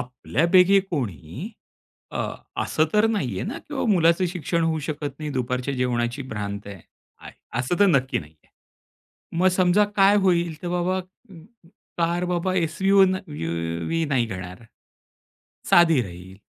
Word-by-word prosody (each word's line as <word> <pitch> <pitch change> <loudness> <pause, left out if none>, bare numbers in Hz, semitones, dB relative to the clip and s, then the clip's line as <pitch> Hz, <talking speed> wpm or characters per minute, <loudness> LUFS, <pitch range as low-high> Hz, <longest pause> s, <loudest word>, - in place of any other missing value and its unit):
आपल्यापैकी 170 +9 +3
कोणी 125 - -4 0.6
अ, - - -5 0.4
असं 155 - +1
तर 210 +1 +5
नाही 135 - -1
आहे - - -3
ना - - -5
की 300 - -10
बाबा 270 - -1
मुलाचं 170 0 +3
शिक्षण 170 -1 -2
होऊ 160 -1 0
शकत 145 -2 -4
नाही, 155 -1 -4
दुपारच्या 125 +1 -2
जेवणाची 125 +1 -1
भ्रांत 100 -2 -5
आहे. 100 -3 -9 0.4
आय - - -11 0.3
असं 130 +8 -2
तर 205 - +7
नक्की 135 -7 +2
नाही 75 0 -11
आहे. - - -31 0.9
मग 185 +2 +5
समजा 185 +3 +4
काय 200 +1 +6
होईल? 175 -3 +2
तर 175 - -3
बाबा 180 +2 0 0.3
म 165 -4 -13 0.5
कार 170 +1 +1
बाबा 180 +1 -1
एस-यु-वी 185 - +1 0.4
व्ही 165 0 0
नाही 130 -4 +1
घेणार, 90 0 -7 1.1
साधी 165 -5 +6
राहील. 90 -1 -10
165 Hz, 145 wpm, -24 LUFS, 125-180 Hz, 1.1 s, तर